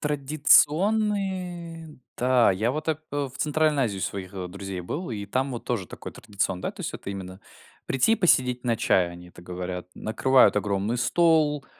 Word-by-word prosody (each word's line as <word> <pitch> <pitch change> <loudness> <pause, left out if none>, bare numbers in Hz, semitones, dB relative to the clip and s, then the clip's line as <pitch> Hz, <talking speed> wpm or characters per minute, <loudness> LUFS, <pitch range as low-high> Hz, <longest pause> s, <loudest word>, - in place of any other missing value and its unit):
Традиционные. 170 +3 +1 0.2
Та, 125 -4 +3
я 110 +6 0
вот 155 +3 -4
ап 155 -1 -1
э, 145 -1 -2
в - - -11
Центральной 150 -1 +1
Азии 100 -4 -3
у - - -6
своих, 95 -1 -5
э, 90 -2 -6
друзей 95 0 -6
был, 145 - -5
и 100 -2 -5
там 130 +6 -1
вот 120 - -6
тоже 115 -7 -2
такой - - -9
традицион 100 -4 -3
да, - - -2
то - - -13
есть - - -4
это 100 - -7
именно 95 -1 -8 0.5
прийти 135 - +2
и - - +5
посидеть 125 -8 +2
на 115 -2 +1
чай, 90 -5 +2
они 90 0 -12
это 85 - -15
говорят. 90 0 -6
Накрывают 130 +1 +3
огромный 100 +3 -1
стол, 150 +1 +2
125 Hz, 185 wpm, -25 LUFS, 95-155 Hz, 0.5 s, и